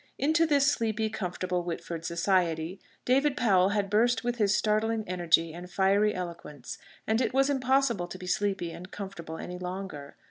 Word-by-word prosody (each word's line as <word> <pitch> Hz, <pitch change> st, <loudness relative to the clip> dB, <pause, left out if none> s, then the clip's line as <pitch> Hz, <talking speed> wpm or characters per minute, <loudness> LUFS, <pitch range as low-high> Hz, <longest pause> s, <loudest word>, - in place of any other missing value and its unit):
Into 315 Hz, +4 st, +3 dB
this 285 Hz, -2 st, +3 dB
sleepy, 220 Hz, -6 st, 0 dB
comfortable 180 Hz, -3 st, -2 dB
Whitford 170 Hz, -1 st, -5 dB
society 170 Hz, 0 st, 0 dB, 0.3 s
David 275 Hz, +3 st, +2 dB
Powell 195 Hz, -7 st, +4 dB
had 205 Hz, -1 st, 0 dB
burst 235 Hz, +5 st, +2 dB
with 240 Hz, 0 st, -1 dB
his 210 Hz, -2 st, +3 dB
startling 220 Hz, +1 st, +1 dB
energy 165 Hz, -2 st, +2 dB
and 175 Hz, +1 st, -9 dB
fiery 200 Hz, +3 st, +2 dB
eloquence, 170 Hz, -7 st, -7 dB, 0.3 s
and 220 Hz, +2 st, +1 dB
it 255 Hz, -, -1 dB
was 270 Hz, +1 st, +4 dB
impossible 260 Hz, -7 st, +1 dB
to 180 Hz, -, -8 dB
be 185 Hz, -, -9 dB
sleepy 185 Hz, -2 st, -1 dB
and 180 Hz, +2 st, -9 dB
comfortable 170 Hz, -6 st, -7 dB
any 180 Hz, +2 st, -6 dB
longer. 180 Hz, -6 st, -6 dB
195 Hz, 165 wpm, -28 LUFS, 175-230 Hz, 0.3 s, Powell